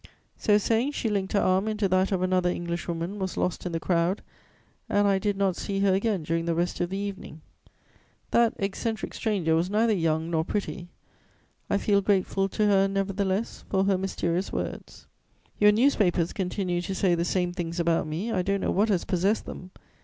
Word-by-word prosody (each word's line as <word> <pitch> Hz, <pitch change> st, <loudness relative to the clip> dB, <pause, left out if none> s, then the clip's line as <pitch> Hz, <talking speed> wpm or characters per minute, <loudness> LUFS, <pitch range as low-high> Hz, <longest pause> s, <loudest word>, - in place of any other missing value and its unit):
"So 210 Hz, -1 st, +3 dB
saying, 230 Hz, +7 st, +1 dB
she 230 Hz, -, -1 dB
linked 195 Hz, -2 st, -1 dB
her 205 Hz, -, +3 dB
arm 190 Hz, +2 st, +2 dB
into 210 Hz, -2 st, 0 dB
that 185 Hz, +1 st, +2 dB
of 185 Hz, -2 st, 0 dB
another 185 Hz, -1 st, +2 dB
Englishwoman, 170 Hz, +2 st, -3 dB
was 190 Hz, -1 st, -3 dB
lost 180 Hz, 0 st, -1 dB
in -, -, -4 dB
the 165 Hz, -, -2 dB
crowd, 170 Hz, +3 st, 0 dB, 0.7 s
and 205 Hz, 0 st, +3 dB
I 195 Hz, -1 st, +3 dB
did 205 Hz, 0 st, -1 dB
not 195 Hz, -2 st, +1 dB
see 195 Hz, +1 st, -3 dB
her 195 Hz, -1 st, +4 dB
again 195 Hz, -2 st, 0 dB
during 165 Hz, +2 st, -1 dB
the 170 Hz, -1 st, 0 dB
rest 175 Hz, +1 st, -1 dB
of 175 Hz, -, 0 dB
the 195 Hz, -, -3 dB
evening. 195 Hz, -6 st, -6 dB, 0.9 s
That 235 Hz, -1 st, +3 dB
eccentric 215 Hz, +3 st, -3 dB
stranger 195 Hz, -8 st, 0 dB
was 165 Hz, +3 st, +1 dB
neither 220 Hz, +2 st, +2 dB
young 165 Hz, -2 st, 0 dB
nor 160 Hz, -1 st, +1 dB
pretty: 175 Hz, -1 st, -4 dB, 0.8 s
I -, -, +2 dB
feel 200 Hz, 0 st, +2 dB
grateful 195 Hz, 0 st, +1 dB
to 215 Hz, +2 st, 0 dB
her, 195 Hz, -1 st, +4 dB
nevertheless, 195 Hz, +1 st, -2 dB
for 190 Hz, -1 st, +2 dB
her 195 Hz, 0 st, +2 dB
mysterious 185 Hz, -1 st, -2 dB
words. -, -, -5 dB, 0.5 s
"Your 210 Hz, 0 st, +7 dB
newspapers 205 Hz, -8 st, +2 dB
continue 180 Hz, -2 st, -2 dB
to 190 Hz, +2 st, -4 dB
say 185 Hz, -2 st, +2 dB
the 170 Hz, 0 st, +1 dB
same 175 Hz, 0 st, 0 dB
things 170 Hz, -1 st, -4 dB
about 170 Hz, -2 st, +1 dB
me. 175 Hz, +10 st, -3 dB
I 190 Hz, -5 st, +1 dB
don't 200 Hz, +1 st, -1 dB
know -, -, 0 dB
what 210 Hz, +4 st, +2 dB
has 190 Hz, -5 st, +1 dB
possessed 195 Hz, +4 st, +1 dB
them. 180 Hz, -, -8 dB
190 Hz, 190 wpm, -26 LUFS, 175-205 Hz, 0.9 s, Your